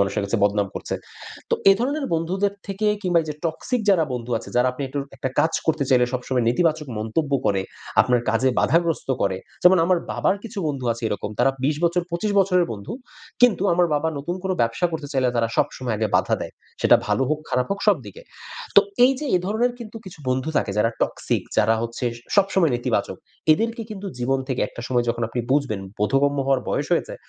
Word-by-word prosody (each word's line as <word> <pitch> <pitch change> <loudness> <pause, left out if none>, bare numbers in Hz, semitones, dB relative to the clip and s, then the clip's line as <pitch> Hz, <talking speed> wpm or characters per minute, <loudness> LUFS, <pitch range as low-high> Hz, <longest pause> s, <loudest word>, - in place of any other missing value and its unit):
মানুষের 100 +1 +1
কাছে 100 +4 -1
বদনাম 100 -1 +1
করছে। - - -4 0.6
তো - - +4 0.2
এধরনের 275 +7 -1
বন্ধুদের 190 +5 0
থেকে, 200 +1 -2 0.2
কিংবা 175 -3 +3
ঐযে 155 -1 -5
toxic 230 +9 -2
যারা 175 -5 +4
বন্ধু 120 0 -5
আছে। - - -11
যারা 125 +1 +4
আপনি 140 - -6
একটু 140 +2 -4 0.2
একটা - - -2
কাজ 160 - +2
করতে 155 -3 +1
চাইলে 125 -2 +5
সবসময় 125 -1 -1
নেতিবাচক 155 +3 +1
মন্তব্য 140 +7 -2
করে, 95 -2 +2 0.4
আপনার 125 -1 +3
কাজে 120 +4 +2
বাধাগ্রস্ত 165 -3 +1
করে। 95 -1 +1 0.3
যেমন 180 +1 +7
আমার 180 0 +3
বাবার 200 - +1
কিছু 225 -2 -8
বন্ধু 140 -4 -3
আছে 115 - -10
এরকম। 105 0 -3
তারা 135 - +4
২০ 145 +2 +1
বছর, 170 +1 +2
২৫ 190 +5 -1
বছরের 180 -2 +3
বন্ধু। 100 -2 -7 0.5
কিন্তু 235 -6 +5
আমার 175 0 +3
বাবা 155 +2 +1
নতুন 175 +6 -3
কোনো 190 - 0
ব্যবসা 115 +9 +1
করতে 155 -3 -4
চাইলে 130 -2 +2
তারা 115 -1 +2
সবসময় 130 -5 0
আগে 110 0 0
বাধা - - +2
দেয়। - - -5 0.3
সেটা - - +6
ভালো 135 - +1
হোক, 155 - +1
খারাপ 125 0 +1
হোক 200 0 -2
সব 205 -4 +6
দিকে। 100 - -11 0.5
তো 200 - +12 0.3
এইযে 270 +3 -1
এ - - +3
ধরনের 235 +4 +1
কিন্তু 230 -2 -9
কিছু 175 - -10
বন্ধু 130 +4 0
থাকে - - +1
যারা 115 +2 +3
toxic - - -1 0.2
যারা 115 - +4
হচ্ছে 115 +2 -4 0.3
সবসময় 190 -5 +3
নেতিবাচক। 110 -6 -1 0.4
এদেরকে 230 +7 -1
কিন্তু 200 -1 -6
জীবন 135 +2 +1
থেকে 130 - -1
একটা - - -10
সময় 125 -2 +1
যখন 120 0 -4
আপনি 120 +1 -2
বুঝবেন, 135 -8 0 0.2
বোধগম্য 140 +6 +2
হওয়ার 135 -2 +3
বয়স - - -1
হয়েছে। - - 0
145 Hz, 195 wpm, -23 LUFS, 120-185 Hz, 0.6 s, তো